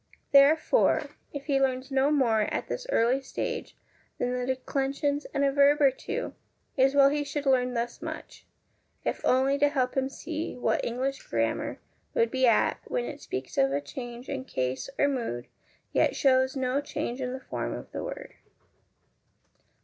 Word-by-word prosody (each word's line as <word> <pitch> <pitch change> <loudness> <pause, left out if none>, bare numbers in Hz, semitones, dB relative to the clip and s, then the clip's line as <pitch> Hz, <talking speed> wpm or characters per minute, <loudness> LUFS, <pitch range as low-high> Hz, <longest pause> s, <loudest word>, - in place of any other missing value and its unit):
Therefore, 295 - +4 0.2
if 285 -1 -6
he 275 -2 +2
learns 260 0 0
no 270 +1 +3
more 235 -8 +2
at - - -2
this - - -4
early 250 - +3
stage 270 - -4 0.4
than 245 0 -1
the 250 0 -2
declensions 275 +2 -1
and 280 - 0
a 275 - +3
verb 280 +2 +5
or 280 -2 +6
two, 435 - -4 0.4
it 265 - +5
is 270 +1 +1
well 275 -1 +7
he 295 +1 0
should 290 0 -4
learn 250 -2 +2
thus 235 0 -3
much, - - -8 0.6
if - - -2
only 265 +2 +3
to 290 0 +4
help 260 -3 0
him 265 -1 +1
to - - -16
see 325 0 -4
what 245 - 0
English 260 +3 -2
grammar 115 -1 -1 0.4
would 230 0 +2
be 260 -1 +3
at 230 - +3
when 120 -1 -1
it 120 - -7
speaks 130 0 -4
of 135 0 +4
a 140 - +1
change 240 - -8
in 270 -1 -3
case 130 - -3
or 285 - +4
mood, 230 - -2 0.5
yet: - - +2
hows 260 -1 +4
no 260 +1 0
change 285 -3 -4
in 250 -1 -2
the 260 - -5
form 265 - -4
of - - -9
the - - -4
word. - - -7
265 Hz, 180 wpm, -28 LUFS, 245-285 Hz, 0.6 s, well